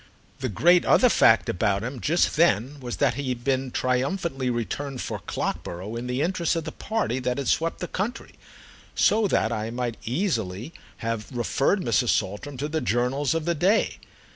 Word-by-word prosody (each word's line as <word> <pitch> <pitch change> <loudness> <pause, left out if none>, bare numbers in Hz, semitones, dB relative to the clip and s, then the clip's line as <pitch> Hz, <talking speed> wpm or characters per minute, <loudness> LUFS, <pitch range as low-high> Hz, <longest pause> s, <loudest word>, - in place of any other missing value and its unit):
The 130 - -2
great 175 - +4
other 250 - +5
fact 115 - +5
about 100 +2 0
him 125 +2 -5
just 170 +4 +2
then 145 - +2
was 125 -2 -5
that 140 -3 +2
he 135 +1 -3
had 120 -1 -3
been 130 0 0
triumphantly 130 +2 -1
returned 125 +3 -3
for - - -4
Clockborough 95 +6 -4
in 120 +1 -4
the 125 +3 0
interest 170 -1 0
of 165 - -2
the 160 - -5
party 215 - -2
that 125 -1 -1
had 140 -3 -3
swept 165 +6 +1
the 180 - -2
country—so 215 0 -2
that 110 - +1
I 110 -1 -2
might 120 -1 -3
easily 115 - -2 0.3
have 115 0 -3
referred 135 - +1
Mrs. 120 - +1
Saltram 105 +8 -1
to 145 +4 -2
the 160 +1 -2
journals 125 +6 0
of 165 -1 -1
the 170 - +2
day. 185 +8 +1
130 Hz, 175 wpm, -25 LUFS, 120-165 Hz, 0.3 s, other